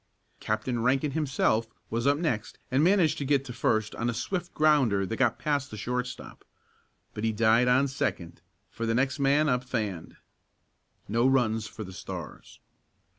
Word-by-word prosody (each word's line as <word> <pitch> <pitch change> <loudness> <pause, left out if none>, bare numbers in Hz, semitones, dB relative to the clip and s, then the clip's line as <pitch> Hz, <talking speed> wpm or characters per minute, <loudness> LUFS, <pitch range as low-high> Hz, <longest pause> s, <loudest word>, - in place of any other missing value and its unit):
Captain 110 +3 -2
Rankin 135 +4 +1
himself 135 -6 +1 0.2
was 115 +3 0
up 140 0 +4
next 135 -10 -2
and 135 +3 +3
managed 180 -3 +3
to - - -2
get 140 -1 +1
to 125 - -7
first 110 -3 0
on 115 +1 -2
a 120 - -2
swift 175 - -3
grounder 135 -11 +3
that 115 - -3
got 120 -1 +1
past 145 -2 -1
the 110 - -8
shortstop. 125 +4 -5 0.7
But 105 - -6
he 115 - +2
died 115 +3 +3
on 130 +3 +4
second, 85 -11 -3 0.3
for 115 - -4
the 115 - +1
next 135 +3 0
man 140 +3 +3
up 125 -2 +1
fanned. 105 -10 -4 0.9
No 115 +4 +2
runs 115 -5 +1
for 110 0 -8
the 95 -2 -9
Stars. - - -9
125 Hz, 170 wpm, -28 LUFS, 110-140 Hz, 0.9 s, up